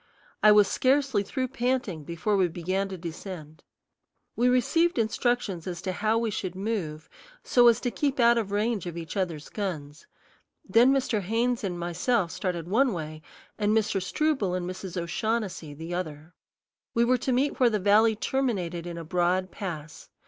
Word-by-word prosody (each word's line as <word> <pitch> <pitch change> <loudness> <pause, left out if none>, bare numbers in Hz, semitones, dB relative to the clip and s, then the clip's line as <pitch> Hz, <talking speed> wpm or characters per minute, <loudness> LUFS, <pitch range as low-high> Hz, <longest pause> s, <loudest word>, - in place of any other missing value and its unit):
I 215 - +7
was 210 -1 +6
scarcely 265 -3 +2
through 255 +5 -3
panting 245 - -1
before 170 +6 -1
we 190 -2 +3
began 185 +4 -2
to 190 - -6
descend. 165 -2 -8 0.7
We 245 +1 +3
received 330 +7 +2
instructions 220 -5 0
as 175 -2 -4
to 185 - -1
how 215 +4 +1
we 230 -1 0
should 185 -2 -4
move 185 -7 -3 0.4
so 245 -1 +5
as 230 -2 +5
to 245 - -1
keep 280 0 -1
out 235 0 +6
of 205 -3 -4
range 210 -2 0
of 170 -1 -6
each 165 +2 -6
other's 170 -6 -2
guns; 160 -7 -5 0.6
then 230 +6 +5
Mr. 260 -6 +1
Haynes 230 +5 0
and 180 -3 -2
myself 175 +3 0
started 175 -3 -3
one 240 +5 +3
way, 155 -2 -6 0.4
and 210 +1 +2
Mr. 215 -3 0
Struble 240 - 0
and 180 -1 -3
Mrs. 185 -1 -5
O'Shaughnessy 175 -3 -2
the 165 +3 -6
other. 160 -2 -5 0.6
We 235 0 +4
were 250 +1 +3
to 260 - -1
meet 265 +4 +1
where 250 -2 +5
the 215 - 0
valley 210 +3 +4
terminated 195 -9 -2
in 170 -1 -6
a 165 - -5
broad 180 +2 0
pass. 160 -6 -7
200 Hz, 170 wpm, -27 LUFS, 175-235 Hz, 0.7 s, I